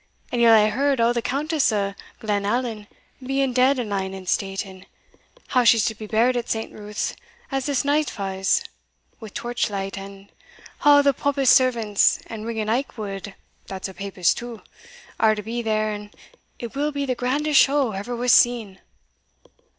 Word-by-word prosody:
And 240 - 0
yell 230 -1 +7
hae 215 0 +5
heard 275 +3 +1
o' 230 +1 +3
the 240 - -1
Countess 290 +3 0
o' 200 -2 -1 0.3
Glenallan 210 +1 -2 0.4
being 270 0 0
dead 260 +2 +3
and 245 -3 -2
lying 195 -2 -3
in 190 -1 -9
state, 195 +2 -1
and 190 -1 -13 0.6
how 250 - +3
she's 230 -2 +5
to 225 - 0
be 215 0 -9
buried 235 +4 +2
at 240 -1 -3
St. 225 0 -3
Ruth's 210 0 -4 0.4
as 270 0 -2
this 280 -1 0
night 295 +1 +2
fa's, 195 -1 -1 0.6
wi' 220 -3 -9
torch 240 +1 -2
light; 195 -1 -4
and 195 0 -11 0.5
a' 290 -1 +7
the 280 -1 +4
popist 280 -1 +2
servants, 230 -6 +3
and 220 0 -7
Ringan 220 -2 -3
Aikwood, 210 -5 -3 0.3
that's 190 0 -5
a 190 - -10
papist 195 -2 0
too, 235 -2 -9 0.6
are 220 -1 +4
to 210 - -6
be 235 +3 -3
there, 215 -1 0
and 210 0 -7 0.5
it 235 0 -8
will 295 +2 0
be 285 -1 -2
the 260 - 0
grandest 280 +4 +2
show 275 -4 +2
ever 205 +5 -5
was 245 +1 +1
seen." 230 -7 +3
230 Hz, 175 wpm, -23 LUFS, 205-255 Hz, 0.6 s, yell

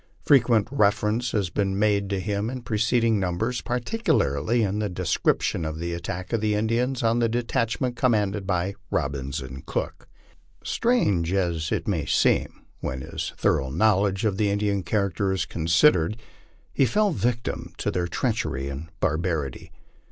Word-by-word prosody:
Frequent 120 -7 +4
reference 110 -1 +2
has 100 -6 -1
been 95 0 0
made 100 -1 +2
to 100 -1 -1
him 105 +2 -2
in 130 -1 -6
preceding 115 0 +2
numbers, 95 +7 -1
particularly 120 - 0
in 100 0 -1
the 105 -1 -1
description 90 -2 0
of 80 0 -3
the 85 +1 -3
attack 90 +4 -5
of 115 - +1
the 105 -1 +1
Indians 120 +4 0
on 115 +1 +2
the 115 -1 +2
detachment 120 +1 -1
commanded 105 -5 +1
by 90 0 0 0.2
Robbins 70 +1 -2
and 65 0 -8
Cook. - - -4 0.6
Strange 100 - +1
as 85 -4 0
it - - -1
may 85 -7 -1
seem, - - +1 0.2
when 65 0 -4
his 80 +3 -5
thor - - +2
ough 65 - -5
knowledge 100 +3 +2
of 100 -3 +1
the 105 -1 +2
Indian 100 -1 0
character 100 +1 0
is 95 -4 0
considered, 85 - +3 0.6
he 135 - +3
fell 210 - +2
a - - -2
victim 120 -4 -2
to - - -1
their 90 -1 -1
treachery 70 -4 -2
and 70 +4 -6
barbarity. 80 -4 -1
100 Hz, 160 wpm, -25 LUFS, 85-115 Hz, 0.6 s, Frequent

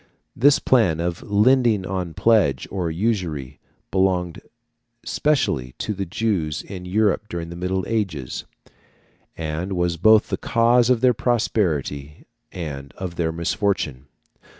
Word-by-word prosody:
This 140 +3 +5
plan 100 -11 +2
of 85 +1 -2
lending 110 -1 +3
on 90 -3 -4
pledge, 105 - +2
or 90 -4 -2
usury, 80 - -2 0.3
belonged 90 -3 0 0.6
specially 105 - 0
to 105 - -3
the 100 -2 -4
Jews 85 -6 -1
in 95 -2 -8
Europe 105 +2 +1
during 85 -2 -5
the - - -7
Middle 90 +2 -2
Ages, 95 - -3 0.9
and 80 +4 -3
was 90 -2 0
both 110 +5 +5
the - - -1
cause 120 +1 +3
of 125 -3 +3
their 125 -1 +5
prosperity 85 - -1 0.3
and 70 -6 -6
of 90 -3 -5
their 80 -1 0
misfortune. 80 -5 -2
90 Hz, 125 wpm, -22 LUFS, 80-110 Hz, 0.9 s, This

